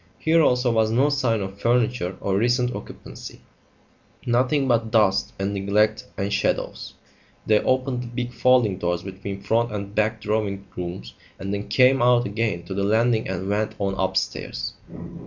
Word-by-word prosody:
Here 165 Hz, +1 st, +3 dB
also 125 Hz, -4 st, +3 dB
was 110 Hz, -1 st, +2 dB
no 130 Hz, +6 st, +3 dB
sign 125 Hz, -6 st, +1 dB
of 95 Hz, +1 st, -7 dB
furniture 120 Hz, -6 st, +1 dB
or 95 Hz, -, 0 dB
recent 120 Hz, +3 st, +1 dB
occupancy; -, -, -9 dB, 0.9 s
nothing 130 Hz, +3 st, +2 dB
but 115 Hz, -2 st, +1 dB
dust 105 Hz, -4 st, +2 dB
and 100 Hz, +1 st, -2 dB
neglect 105 Hz, +2 st, +1 dB
and 100 Hz, +1 st, -2 dB
shadows. -, -, -2 dB, 0.5 s
They 110 Hz, -1 st, +4 dB
opened 130 Hz, -1 st, 0 dB
the 125 Hz, -, -6 dB
big 120 Hz, +1 st, -4 dB
folding 120 Hz, -5 st, +3 dB
doors 85 Hz, 0 st, -1 dB
between 95 Hz, +1 st, -7 dB
front 115 Hz, +1 st, +1 dB
and 100 Hz, -1 st, -5 dB
back 110 Hz, 0 st, 0 dB
drawing 105 Hz, -2 st, -2 dB
rooms 85 Hz, -9 st, -6 dB, 0.2 s
and 95 Hz, +1 st, -4 dB
then 100 Hz, 0 st, -4 dB
came 130 Hz, 0 st, +4 dB
out 120 Hz, 0 st, +4 dB
again 105 Hz, -4 st, -2 dB
to 95 Hz, -, -6 dB
the 100 Hz, -, -2 dB
landing 110 Hz, +2 st, +2 dB
and 95 Hz, 0 st, -4 dB
went 105 Hz, +2 st, -1 dB
on 100 Hz, -1 st, -1 dB
upstairs. 95 Hz, -10 st, -2 dB
110 Hz, 160 wpm, -23 LUFS, 100-120 Hz, 0.9 s, They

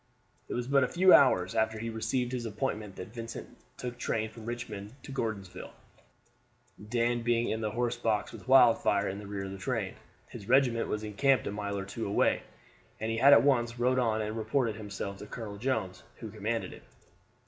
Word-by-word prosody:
It -, -, -3 dB
was 120 Hz, 0 st, -2 dB
but 140 Hz, 0 st, +4 dB
a -, -, +2 dB
few 185 Hz, +4 st, +5 dB
hours 95 Hz, -10 st, +5 dB
after 110 Hz, 0 st, +1 dB
he 115 Hz, +1 st, -4 dB
received 120 Hz, +2 st, -1 dB
his 120 Hz, -2 st, -3 dB
appointment 105 Hz, -3 st, -3 dB
that 95 Hz, +4 st, -9 dB
Vincent 115 Hz, -1 st, -7 dB, 0.2 s
took 125 Hz, -1 st, -6 dB
train 110 Hz, -2 st, -1 dB
from 115 Hz, -1 st, -11 dB
Richmond 115 Hz, -3 st, -6 dB
to -, -, -9 dB
Gordonsville, 110 Hz, -8 st, -4 dB, 1.2 s
Dan 120 Hz, 0 st, +1 dB
being 120 Hz, 0 st, +1 dB
in 110 Hz, -, -2 dB
the 110 Hz, -, -1 dB
horse 120 Hz, +2 st, -1 dB
box 110 Hz, -3 st, 0 dB
with -, -, -11 dB
Wildfire 115 Hz, -6 st, +5 dB
in 95 Hz, +1 st, -4 dB
the 105 Hz, -, -9 dB
rear 100 Hz, -1 st, -4 dB
of 95 Hz, -, -6 dB
the 95 Hz, -, -8 dB
train. 95 Hz, -, -2 dB, 0.3 s
His 100 Hz, -, -10 dB
regiment 125 Hz, -4 st, +3 dB
was 105 Hz, 0 st, -3 dB
encamped 130 Hz, +6 st, +2 dB
a -, -, -2 dB
mile 100 Hz, -1 st, -3 dB
or 95 Hz, -, -4 dB
two 110 Hz, +3 st, -5 dB
away, 100 Hz, -, +2 dB, 0.6 s
and 110 Hz, +1 st, -2 dB
he 115 Hz, -, -1 dB
at 140 Hz, 0 st, +8 dB
once 120 Hz, -4 st, +2 dB
rode 125 Hz, +2 st, +2 dB
on 110 Hz, -3 st, +1 dB
and 105 Hz, +1 st, -4 dB
reported 115 Hz, +1 st, 0 dB
himself 100 Hz, -2 st, -6 dB
to 105 Hz, -, -9 dB
Colonel 105 Hz, -2 st, -7 dB
Jones, 105 Hz, -7 st, -2 dB
who 110 Hz, -3 st, -8 dB
commanded 110 Hz, +2 st, -3 dB
it. -, -, -12 dB
115 Hz, 195 wpm, -30 LUFS, 105-120 Hz, 1.2 s, at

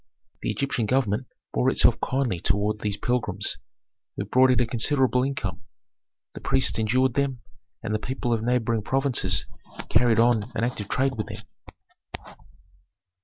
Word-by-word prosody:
The -, -, -2 dB
Egyptian 130 Hz, -5 st, -1 dB
government 125 Hz, -1 st, 0 dB, 0.3 s
bore 60 Hz, -, +2 dB
itself -, -, +3 dB
kindly 125 Hz, -9 st, 0 dB
toward 105 Hz, +4 st, 0 dB
these 105 Hz, -1 st, -2 dB
pilgrims, 105 Hz, -8 st, -1 dB, 0.6 s
who -, -, -3 dB
brought 130 Hz, +1 st, +4 dB
it 125 Hz, -, +3 dB
a 120 Hz, -, +3 dB
considerable 125 Hz, +2 st, +2 dB
income; 105 Hz, -8 st, -3 dB, 0.7 s
the -, -, -9 dB
priests -, -, +2 dB
endured 125 Hz, +4 st, +2 dB
them, 135 Hz, -3 st, -1 dB, 0.4 s
and 110 Hz, -1 st, -2 dB
the 110 Hz, -, 0 dB
people 125 Hz, 0 st, -2 dB
of 115 Hz, -, 0 dB
neighboring 115 Hz, -1 st, 0 dB
provinces 135 Hz, +3 st, 0 dB, 0.4 s
carried 120 Hz, -3 st, +3 dB
on 115 Hz, -1 st, +2 dB
an -, -, -1 dB
active 115 Hz, -4 st, -2 dB
trade 135 Hz, +1 st, +1 dB
with 105 Hz, -, -3 dB
them. -, -, -8 dB
120 Hz, 145 wpm, -25 LUFS, 105-130 Hz, 0.7 s, brought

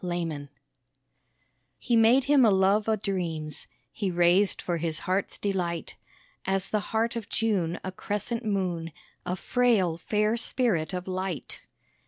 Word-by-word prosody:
THE -, -, -3 dB
POET 165 Hz, -5 st, -3 dB, 1.3 s
He 240 Hz, -, 0 dB
made 230 Hz, +4 st, +5 dB
him 280 Hz, -1 st, +5 dB
a 225 Hz, -, +6 dB
love 200 Hz, +2 st, +3 dB
o' 220 Hz, -, +4 dB
dreams 170 Hz, -7 st, -3 dB, 0.2 s
He 200 Hz, +4 st, -2 dB
raised 175 Hz, +3 st, +3 dB
for 175 Hz, -1 st, -2 dB
his 165 Hz, -1 st, -1 dB
heart's 190 Hz, +1 st, -1 dB
delight 180 Hz, -4 st, -2 dB, 0.5 s
(As 195 Hz, 0 st, -1 dB
the 215 Hz, -, +1 dB
heart 225 Hz, +1 st, 0 dB
of 225 Hz, -3 st, -5 dB
June 195 Hz, -7 st, 0 dB
a 185 Hz, -, -4 dB
crescent 210 Hz, +5 st, -3 dB
moon) 180 Hz, -6 st, -2 dB, 0.3 s
A 180 Hz, -, 0 dB
frail, 205 Hz, -6 st, +2 dB
fair 210 Hz, +5 st, +1 dB
spirit 225 Hz, -10 st, 0 dB
of 180 Hz, 0 st, -4 dB
light. 185 Hz, -4 st, -4 dB
190 Hz, 145 wpm, -27 LUFS, 175-220 Hz, 1.3 s, a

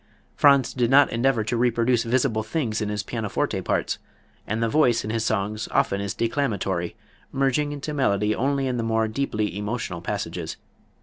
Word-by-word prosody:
Franz 140 Hz, -3 st, +4 dB
did 120 Hz, -2 st, +1 dB
not 140 Hz, +2 st, +6 dB
endeavor 120 Hz, 0 st, +2 dB
to 110 Hz, +3 st, -2 dB
reproduce 120 Hz, 0 st, +2 dB
visible 120 Hz, -1 st, +1 dB
things 110 Hz, -1 st, -2 dB
in 105 Hz, -, -1 dB
his 105 Hz, -3 st, -2 dB
pianoforte -, -, -2 dB
parts, -, -, -1 dB, 0.5 s
and 110 Hz, +2 st, -1 dB
the -, -, +2 dB
voice 120 Hz, -3 st, +3 dB
in 105 Hz, -, -3 dB
his 115 Hz, -1 st, -1 dB
songs 110 Hz, 0 st, -1 dB
often 100 Hz, 0 st, +1 dB
is 100 Hz, 0 st, -3 dB
declamatory, 100 Hz, -8 st, -1 dB, 0.4 s
merging 135 Hz, +2 st, +1 dB
into 145 Hz, +1 st, -5 dB
melody 105 Hz, -7 st, +1 dB
only 135 Hz, +3 st, 0 dB
in 125 Hz, -2 st, -1 dB
the -, -, 0 dB
more 110 Hz, 0 st, +1 dB
deeply 110 Hz, -4 st, -2 dB
emotional 105 Hz, -4 st, -3 dB
passages. -, -, -4 dB
115 Hz, 170 wpm, -24 LUFS, 105-135 Hz, 0.5 s, not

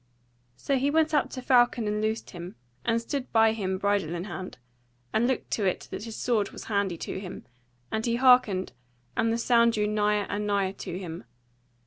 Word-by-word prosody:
So 275 Hz, -, 0 dB
he 275 Hz, +2 st, +2 dB
went 315 Hz, +1 st, +2 dB
up 295 Hz, -, +2 dB
to 255 Hz, -, -7 dB
Falcon 240 Hz, -3 st, +4 dB
and 210 Hz, 0 st, -1 dB
loosed 220 Hz, +1 st, -2 dB
him, 175 Hz, +1 st, -8 dB, 0.3 s
and 230 Hz, 0 st, +2 dB
stood 255 Hz, +3 st, -4 dB
by 225 Hz, -1 st, +5 dB
him 190 Hz, -4 st, -2 dB
bridle 200 Hz, -4 st, 0 dB
in 170 Hz, -, -3 dB
hand, 185 Hz, -1 st, -7 dB, 0.6 s
and 230 Hz, +2 st, +3 dB
looked 260 Hz, -, -2 dB
to 210 Hz, -, 0 dB
it 185 Hz, -, -2 dB
that 210 Hz, -, -5 dB
his 225 Hz, -1 st, -7 dB
sword 220 Hz, -5 st, 0 dB
was -, -, -9 dB
handy 200 Hz, -5 st, -1 dB
to 190 Hz, -, -5 dB
him: 190 Hz, -1 st, -8 dB, 0.5 s
and 220 Hz, -, -1 dB
he 235 Hz, 0 st, +1 dB
hearkened, 245 Hz, -7 st, +4 dB, 0.4 s
and 225 Hz, -, +2 dB
the 230 Hz, -, +1 dB
sound 235 Hz, -1 st, +4 dB
drew 210 Hz, -1 st, +1 dB
nigher 210 Hz, -1 st, +1 dB
and 210 Hz, +1 st, -2 dB
nigher 200 Hz, -2 st, +1 dB
to 175 Hz, -, -5 dB
him. 170 Hz, -8 st, -7 dB
215 Hz, 195 wpm, -27 LUFS, 195-235 Hz, 0.6 s, by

